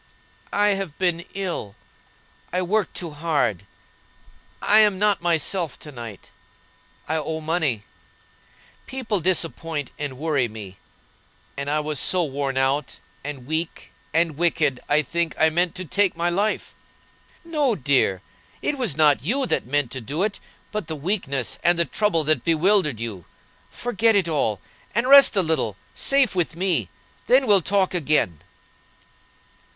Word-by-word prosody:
"I 205 +1 +3
have 195 -6 -2
been 175 -2 0
ill; 175 - -4 0.8
I 180 +1 0
worked 205 +3 0
too 170 -3 -6
hard; 145 - -1 0.9
I'm 210 -2 +5
not 205 -1 +2
myself 170 -1 0
to 150 - -10
night. 115 -6 -9 0.8
I 160 - 0
owe 160 +1 -3
money. 155 -9 0 1.0
People 245 -6 -2
disappoint 165 -4 -1
and 145 -3 -4
worry 145 -4 0
me; 105 -4 -10 0.8
and 140 0 -3
I 150 +1 +1
was 150 -2 -2
so 180 -1 +2
worn 140 -2 -3
out, 135 +2 0 0.3
and 140 -3 -7
weak, 160 +3 -4 0.2
and 165 -2 +2
wicked, 155 -6 +1
I 150 +1 +3
think 170 +3 -2
I 160 0 +4
meant 175 +2 +1
to 185 0 -5
take 200 +3 +1
my 170 +1 +1
life." 205 +5 -1 0.7
"No, 295 -8 +1
dear; 130 - +1 0.4
it 285 - -1
was 215 - 0
not 150 -4 +4
you 255 - 0
that 235 - -1
meant 145 -2 0
to 130 - -5
do 145 - -2
it, 210 -1 -2 0.3
but 210 -6 -4
the 160 - -3
weakness 140 - -2
and 175 0 +4
the 170 - +3
trouble 200 -6 +1
that 155 +1 +1
bewildered 165 - +2
you. 110 -7 -6 0.4
Forget 230 -2 +1
it 195 -4 +2
all, 140 - 0 0.3
and 235 +3 +1
rest 275 -3 +8
a 195 - +4
little, 155 - -1 0.2
safe 275 -4 +2
with 175 -3 -1
me; 170 - 0 0.4
then 260 +2 +4
we'll 205 -5 +5
talk 190 +2 +1
again." 150 - +1
165 Hz, 145 wpm, -23 LUFS, 140-195 Hz, 1.0 s, rest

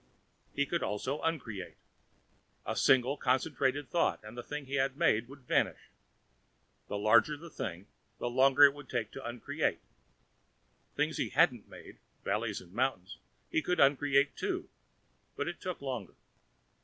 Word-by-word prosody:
He 140 - +2
could 170 +3 -1
also 130 +8 -2
uncreate. 115 - -3 0.9
A - - -2
single 130 +2 +4
concentrated 135 +1 0
thought 170 - +2
and 105 +2 -10
the 120 - -5
thing 145 +3 -6
he 135 - -9
had 135 0 0
made 120 -9 +2
would 140 +2 -13
vanish. 125 - 0 1.0
The 105 - -3
larger 115 +8 +4
the 165 +2 -11
thing, 90 +2 -5 0.3
the - - -3
longer 135 +3 +5
it 145 -1 +4
took 115 -3 -2
to 135 - -8
uncreate. 120 0 -2 1.1
Things - - 0
he - - -1
hadn't - - +3
made - - -13 0.2
valleys - - -1
and 90 0 -16
mountains 110 -6 -1 0.3
he 160 - +2
could 180 +1 -1
uncreate, 140 0 +4
too, - - -3 0.7
but 145 - -2
it 175 - -5
took 180 -5 -4
longer. 125 -8 -5
135 Hz, 145 wpm, -32 LUFS, 120-145 Hz, 1.1 s, longer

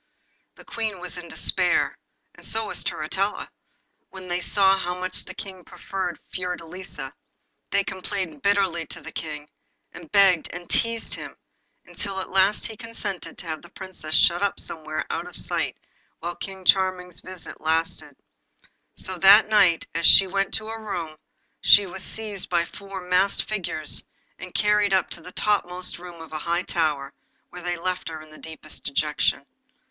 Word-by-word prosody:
The - - -15
Queen 220 -5 -2
was 180 0 -4
in 175 - -9
despair, - - +3 0.4
and - - -17
so 225 0 +2
was 205 - -1
Turritella, 190 +7 -2 0.6
when 185 -1 -10
they 175 +1 0
saw 195 0 +4
how 180 -1 -3
much 185 0 -2
the 185 - -9
King 190 -2 -8
preferred 185 -2 -4
Fiordelisa. 180 -5 -4 0.6
They 200 - +2
complained 185 -5 -4
bitterly 195 -5 +2
to - - -6
the - - -9
King, 150 -2 -6 0.4
and 170 -2 -12
begged 195 -5 +5
and 175 0 -8
teased 230 -1 +1
him, - - -7 0.5
until 200 -2 -4
he 190 - -2
at - - -7
last 190 +2 +3
consented 225 -5 -5
to - - -9
have 160 -1 -4
the 175 - -14
Princess 185 -5 -4
shut 175 +1 +5
up 200 -1 +1
somewhere 155 -1 -3
out - - -3
of - - -10
sight - - +1 0.4
while 175 +1 -4
King 190 -1 -7
Charming's 185 -2 +2
visit 185 -2 -8
lasted. 160 +1 -1 0.8
So 185 -2 0
that 200 +4 +8
night, 185 -6 +4
as 165 -1 +4
she 195 - +9
went 195 +1 -1
to 220 - 0
her 225 0 -6
room, 170 -7 -4 0.5
she 205 - +8
was 190 0 -6
seized 215 -3 -3
by 170 -1 +2
four 195 +1 -8
masked 180 +2 +2
figures, 170 -7 0 0.4
and 180 +1 -8
carried 210 -1 +3
up 190 - +1
into 170 - -5
the 180 - -10
topmost 180 -4 0
room 175 -1 -10
of 160 - -12
a 155 - -2
high 170 +3 0
tower, 150 -6 0 0.4
where 180 - -8
they 175 0 -2
left 180 0 -3
her 160 -1 -6
in 155 0 -13
the 155 - -13
deepest 160 -1 -9
dejection. 140 -1 0
180 Hz, 170 wpm, -25 LUFS, 165-195 Hz, 0.8 s, she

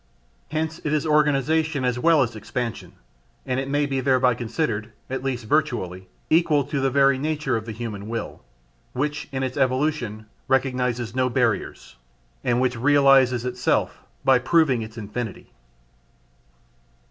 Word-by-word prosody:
Hence 160 +1 -3
it 150 - -1
is 155 0 0
organization 150 -1 +2
as 125 -1 0
well 160 0 +4
as 120 -2 -4
expansion, 110 -4 -5 0.5
and 130 -1 -1
it 135 0 -4
may 145 +1 +1
be 135 -1 -1
thereby 130 -2 +3
considered, 115 -2 -3 0.2
at 130 - -3
least 125 -4 -3
virtually, 95 - -1 0.2
equal 155 -3 +3
to 140 +1 -3
the 135 0 +2
very 135 0 +3
nature 150 -3 -1
of 110 0 -4
the - - -4
human 110 -2 -6
will, 115 0 -5 0.5
which 150 +3 -2
in 135 -1 -2
its 130 0 -3
evolution 130 -5 0 0.2
recognises 125 -3 0
no 130 0 +1
barriers, 120 -4 -1 0.5
and 120 0 +1
which 125 -2 0
realises 135 -2 +4
itself 125 0 0 0.3
by 130 -1 +5
proving 135 -2 +2
its 110 +1 -8
infinity. 110 0 -6
130 Hz, 145 wpm, -23 LUFS, 120-145 Hz, 0.5 s, by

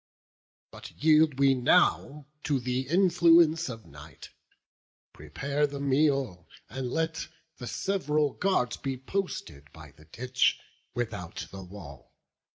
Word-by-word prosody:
But - - -10
yield 155 -2 +4
we 135 -1 +4
now 145 +1 +2 0.2
to 145 -2 +1
th' 125 +1 -3
influence 170 -3 +4
of 115 -2 -8
night: 75 +2 -13 0.8
Prepare 140 - -2
the 140 0 -7
meal; 135 - 0 0.2
and 130 +1 -4
let 160 +3 -2 0.3
the 125 - -7
sev'ral 150 -6 -1
guards 155 -11 0
Be 135 -1 -4
posted 125 - -5
by 80 -2 -13
the 75 +2 -20
ditch, 125 +7 0 0.4
without 105 -8 -4
the 95 - -8
wall. 90 -8 -12
135 Hz, 120 wpm, -28 LUFS, 105-155 Hz, 0.8 s, yield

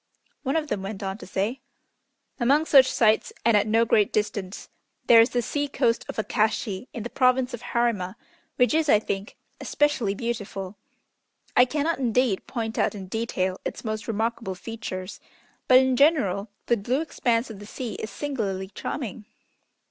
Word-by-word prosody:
One 270 +1 -1
of 315 -1 0
them 200 - -2
went 195 +1 -6
on 195 +2 -4
to - - -10
say: 205 +8 -2 0.8
"Among 280 +6 +3
such 270 -4 +6
sights 220 -2 +3
and 230 -1 +5
at 205 0 +3
no 225 +2 +3
great 210 -3 +3
distance, 205 -2 -3 0.4
there 230 -1 +8
is 230 - +3
the 245 -1 -1
sea 290 +3 -1
coast 240 -4 0
of - - -6
Akashi, 220 0 -1
in 230 - -6
the 240 - -5
Province 255 0 +2
of 240 - -5
Harima, 235 -6 -1 0.4
which 250 +4 +3
is, 315 -1 +2
I 215 - +7
think, 200 -1 -4 0.2
especially 270 -9 +1
beautiful. 205 -4 -4 0.8
I 250 - +7
cannot, 300 +4 -1
indeed, 245 -4 +1
point 225 -3 -3
out - - +1
in 190 -2 -8
detail 190 -4 -2
its - - -6
most 215 0 -3
remarkable 225 -2 -2
features, 190 -2 -6 0.5
but, 255 - +8
in 260 0 +4
general, 240 - +3 0.2
the 235 - +2
blue 245 +8 -1
expanse 240 -7 0
of 205 - -9
the 205 - -10
sea 240 0 -5
is 220 - -4
singularly 200 -7 -3
charming. 215 0 -5
230 Hz, 170 wpm, -25 LUFS, 205-255 Hz, 0.8 s, there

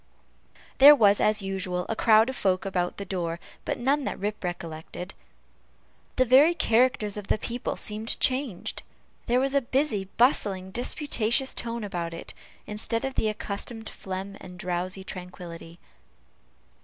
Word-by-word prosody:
There 290 +2 +11
was, 205 -6 +4
as 210 -1 +2
usual, 185 -2 -3
a 225 - -2
crowd 220 0 +5
of 260 - -3
folk 185 -4 0
about 180 -2 -1
the 200 - -5
door, 170 -3 -3 0.3
but - - -1
none 275 +4 +1
that - - -3
Rip 210 +2 -4
recollected. 175 +1 -6 1.0
The 255 - +3
very 280 +8 +6
character 250 -5 +3
of 205 -1 -4
the - - +2
people 240 +4 -4
seemed 215 +1 -3
changed. 255 -7 0 0.5
There 245 +1 +3
was 270 +1 0
a 280 - +3
busy, 255 -5 0
bustling, 200 -7 +2
disputatious 245 +1 +1
tone 235 -1 -3
about 170 -4 -4
it, - - -3 0.3
instead 230 +3 -2
of 270 - -3
the 220 - +1
accustomed 215 +2 -5
phlegm 195 +1 -6
and 180 -1 -11
drowsy 180 +2 -3
tranquillity. 175 -2 -9
210 Hz, 145 wpm, -27 LUFS, 185-245 Hz, 1.0 s, There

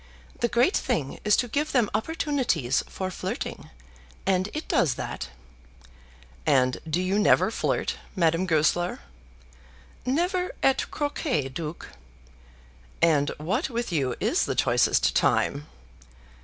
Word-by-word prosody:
The 235 - +2
great 240 - +3
thing 140 -4 -1
is 210 -1 +4
to 245 - +1
give 295 +6 -1
them 245 -5 +3
opportunities 230 - 0
for 185 -1 -4
flirting, - - -5 0.6
and 190 +1 +1
it 310 - -5
does 140 -8 +2
that." - - -5 1.1
"And 130 -2 +2
do 160 +3 +1
you 185 +3 +1
never 210 - +4
flirt, - - -1 0.2
Madame 170 0 +2
Goesler?" 165 +2 +1 1.0
"Never 355 +8 0
at 270 0 +2
croquet, 290 - -1
Duke." 155 +4 -6 1.1
"And 150 -4 +3
what 205 - -1
with 235 -3 -3
you 135 -6 0
is - - +1
the - - -2
choicest - - +3
time?" 145 +1 +1
190 Hz, 120 wpm, -26 LUFS, 155-260 Hz, 1.1 s, is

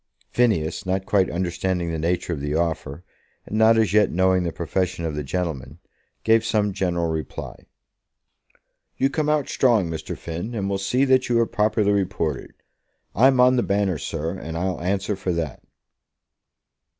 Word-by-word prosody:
Phineas, 105 -11 +1
not 95 +1 -1
quite 95 -2 +2
understanding 90 0 -2
the 80 - -3
nature 85 +2 -1
of 75 - -4
the 75 +1 -2
offer, 80 -1 -2 0.4
and - - -6
not 110 +1 +5
as 110 -4 +2
yet 105 -2 +4
knowing 95 +1 +3
the 85 -1 -2
profession 90 +1 -2
of 80 - -2
the 75 - -3
gentleman, 75 -3 -4 0.5
gave 115 0 +4
some 105 -3 0
general 90 -3 -1
reply. 80 -1 -6 1.3
"You 135 +1 +1
come 150 +1 0
out 150 -2 +1
strong, 110 -10 +2
Mr. 80 -1 -5
Finn, 85 +8 -5
and 100 -3 -2
we'll 100 0 -1
see 125 +8 +1
that 130 -1 +3
you 120 -1 +3
are 115 - +4
properly 105 -2 +1
reported. 95 -5 -1 0.6
I'm 130 +4 +4
on 125 +1 +5
the - - +3
Banner, 100 -6 0
sir, 80 +4 -3
and 80 +1 -6
I'll 90 -1 -2
answer 95 +3 -1
for 95 -2 -2
that." 80 -5 -3
95 Hz, 165 wpm, -23 LUFS, 85-110 Hz, 1.3 s, not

